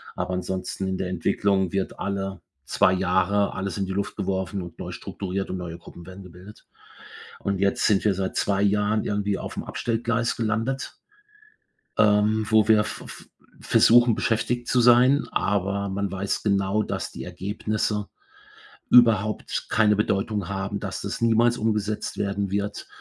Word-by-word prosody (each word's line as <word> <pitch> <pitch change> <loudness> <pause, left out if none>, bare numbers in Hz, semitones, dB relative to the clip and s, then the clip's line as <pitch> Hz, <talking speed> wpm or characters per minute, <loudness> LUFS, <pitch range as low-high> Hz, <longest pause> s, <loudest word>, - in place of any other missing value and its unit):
aber 90 +1 -3
ansonsten 95 +1 -3
in 95 -1 -2
der 90 - -3
Entwicklung 95 +1 0
wird 95 -1 -2
alle 95 -2 -3 0.2
2 95 - +3
Jahre 95 +2 +1
alles 95 -2 -4
in 95 - -1
die 95 - -5
Luft 100 0 -3
geworfen 95 0 -2
und 85 -2 -9
neu - - -6
strukturiert 95 0 -5
und 95 - -3
neue 85 -2 -6
Gruppen 85 -1 -13
werden 95 +1 -11
gebildet. 90 +4 -14 0.8
Und 100 -1 -2
jetzt 100 0 +1
sind 100 -1 +2
wir 100 -3 +3
seit 95 0 -3
2 100 0 +1
Jahren 105 +1 +1
irgendwie 105 -1 -1
auf'm - - -6
Abstellgleis 115 0 -1
gelandet. 115 +4 -2 1.0
Ähm, 105 +1 +3
wo 110 -1 +4
wir 105 -1 +5
v - - -7
v - - -11 0.4
versuchen, 120 -1 +5
beschäftigt 115 +2 -1
zu 125 - +2
sein. 125 +4 +5
Aber 100 0 -1
man 100 0 -2
weiß 95 +1 -2
genau, 100 0 +1
dass - - -4
die - - -7
Ergebnisse 105 +1 -3 0.8
überhaupt 110 -4 +3
keine 105 -1 +3
Bedeutung 100 -1 -1
haben, 95 0 -3
dass - - -5
das - - -5
niemals 115 +1 +3
umgesetzt 105 -1 -2
werden 100 -1 -1
wird 100 +1 -3
100 Hz, 155 wpm, -24 LUFS, 95-110 Hz, 1.0 s, wir